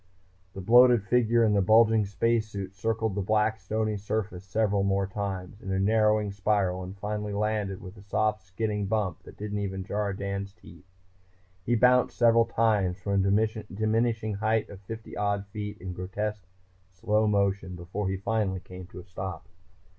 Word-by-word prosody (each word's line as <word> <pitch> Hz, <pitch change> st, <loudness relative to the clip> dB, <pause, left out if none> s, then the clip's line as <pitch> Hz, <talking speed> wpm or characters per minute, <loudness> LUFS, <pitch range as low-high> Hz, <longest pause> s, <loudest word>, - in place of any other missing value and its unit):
The 95 Hz, -, -6 dB
bloated 120 Hz, +2 st, +6 dB
figure 120 Hz, +1 st, +3 dB
in 110 Hz, -2 st, +3 dB
the 100 Hz, -, +3 dB
bulging 110 Hz, +1 st, +5 dB
space 115 Hz, +2 st, +1 dB
suit 100 Hz, -2 st, -6 dB
circled 110 Hz, +2 st, -1 dB
the 100 Hz, -, -1 dB
black 110 Hz, +2 st, +1 dB
stony 110 Hz, +2 st, -1 dB
surface 100 Hz, -2 st, -3 dB
several 100 Hz, +1 st, +1 dB
more 100 Hz, 0 st, +1 dB
times, 100 Hz, 0 st, -5 dB
in 95 Hz, -, -5 dB
a 95 Hz, -, +1 dB
narrowing 105 Hz, +1 st, +2 dB
spiral, 100 Hz, -2 st, 0 dB
and 95 Hz, +2 st, -8 dB
finally 105 Hz, +1 st, -3 dB
landed 105 Hz, -2 st, -1 dB
with 95 Hz, +2 st, -10 dB
a -, -, -12 dB
soft 105 Hz, +2 st, 0 dB
skidding 105 Hz, +2 st, -3 dB
bump 100 Hz, -5 st, -1 dB
that -, -, -14 dB
didn't 105 Hz, 0 st, -4 dB
even 95 Hz, -1 st, -3 dB
jar 100 Hz, +1 st, -2 dB
Dan's 100 Hz, 0 st, -4 dB
teeth. 90 Hz, -3 st, -16 dB, 0.8 s
He 120 Hz, +6 st, +1 dB
bounced 125 Hz, +2 st, +4 dB
several 115 Hz, -1 st, +5 dB
times 105 Hz, -6 st, +1 dB
from 100 Hz, +1 st, 0 dB
a 110 Hz, +3 st, +1 dB
diminishing 110 Hz, +1 st, 0 dB
height 110 Hz, +2 st, 0 dB
of 100 Hz, -1 st, -11 dB
fifty 110 Hz, +3 st, -8 dB
odd 100 Hz, -1 st, -1 dB
feet 105 Hz, 0 st, -5 dB
in 95 Hz, -2 st, -6 dB
grotesque 100 Hz, +2 st, -4 dB, 0.4 s
slow 105 Hz, +3 st, +1 dB
motion 100 Hz, -2 st, 0 dB
before 90 Hz, +3 st, -4 dB
he 95 Hz, -, -1 dB
finally 100 Hz, -2 st, -1 dB
came 90 Hz, 0 st, -11 dB
to 90 Hz, -, -10 dB
a -, -, -17 dB
stop. 95 Hz, -1 st, -6 dB
105 Hz, 170 wpm, -28 LUFS, 95-110 Hz, 0.8 s, bloated